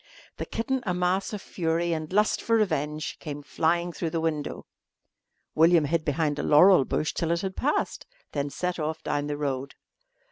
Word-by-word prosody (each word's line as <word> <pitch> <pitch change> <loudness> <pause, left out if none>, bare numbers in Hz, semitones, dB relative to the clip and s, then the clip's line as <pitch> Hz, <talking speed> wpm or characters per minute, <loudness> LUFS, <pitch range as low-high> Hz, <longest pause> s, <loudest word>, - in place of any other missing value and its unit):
The - - -5
kitten, 260 +3 -2
a 180 - +1
mass 180 +2 0
of 210 -3 -6
fury 170 0 -1
and 155 0 -4
lust 210 +2 +2
for 230 - +2
revenge, 155 -7 -1
came 145 -1 -6
flying 170 +5 0
through 165 - -3
the 165 +1 -2
window. 160 -2 -3 0.9
William 165 0 +5
hid 160 +2 0
behind 150 0 0
a - - -1
laurel 155 0 +6
bush 155 - -1
till 165 - -1
it 170 0 +1
had 190 -1 -4
passed, 290 +3 -1 0.2
then 145 -1 -2
set 180 +4 -3
off 155 +1 -3
down 145 0 -1
the 145 0 -3
road. 140 -2 -3
165 Hz, 180 wpm, -27 LUFS, 150-180 Hz, 0.9 s, laurel